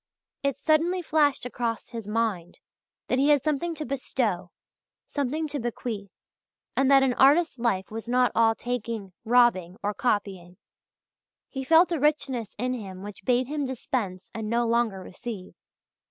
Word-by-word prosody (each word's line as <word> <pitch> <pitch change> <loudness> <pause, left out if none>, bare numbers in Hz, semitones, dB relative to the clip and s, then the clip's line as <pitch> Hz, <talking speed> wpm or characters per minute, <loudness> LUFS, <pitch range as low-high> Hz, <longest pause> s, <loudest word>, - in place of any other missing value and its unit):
It 280 -1 0
suddenly 335 +4 +2
flashed 295 -5 +2
across 235 -2 -3
his 230 -3 -7
mind 210 -6 -2 0.5
that 255 - +1
he 280 +2 +3
had 290 -3 +4
something 315 +3 -1
to 305 0 -5
bestow, 240 -8 -1 0.6
something 295 +3 -2
to 285 - -3
bequeath, 230 -4 -4 0.7
and 270 0 +3
that 275 -1 +7
an 260 -2 +2
artist's 285 +2 +4
life 205 -6 0
was 225 +1 -6
not 250 +1 +3
all 225 0 +4
taking, 230 -6 -4
robbing, 220 -7 +3
or 205 - 0
copying. 195 -7 -2 0.9
He 265 -1 -4
felt 330 +6 +5
a 335 - 0
richness 265 -6 0
in 250 +3 -1
him 195 -6 -7
which 205 -1 -9
bade 250 0 +3
him 290 +1 -2
dispense 220 -7 -4
and 220 -1 -4
no 235 +1 +2
longer 230 -5 +1
receive. 195 -1 -8
240 Hz, 155 wpm, -26 LUFS, 210-275 Hz, 0.9 s, that